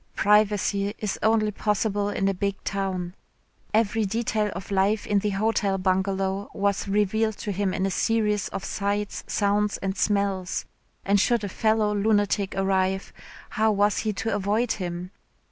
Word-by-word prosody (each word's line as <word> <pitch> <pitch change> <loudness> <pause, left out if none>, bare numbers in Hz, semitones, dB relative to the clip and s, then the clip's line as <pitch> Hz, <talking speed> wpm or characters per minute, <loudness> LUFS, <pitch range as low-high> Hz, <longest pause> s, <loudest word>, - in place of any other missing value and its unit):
Privacy 205 0 +2
is 210 -3 -3
only 220 -1 +2
possible 205 0 0
in 195 -1 0
a 195 - +2
big 200 +1 -1
town. 190 -3 -2 0.6
Every 220 0 +2
detail 215 0 0
of 190 - -7
life 200 +2 +2
in 205 -1 +2
the 210 +1 -1
Hotel 200 -1 +1
Bungalow 190 +1 0
was 200 0 0
revealed 210 +2 +1
to 210 - -4
him 195 0 0
in 190 - -1
a 195 - 0
series 210 -1 +1
of 195 - -5
sights, 205 0 -2
sounds 205 0 +1
and 195 0 -3
smells. 200 -3 0 0.4
And 200 +1 +3
should 235 +2 +2
a 200 - -3
fellow 215 +1 +1
lunatic 205 -1 +1
arrive, 190 0 0 0.4
how 220 0 +2
was 205 +1 +2
he 215 - -1
to 225 +3 -2
avoid 210 +4 0
him? 180 -1 -4
205 Hz, 155 wpm, -25 LUFS, 195-210 Hz, 0.6 s, And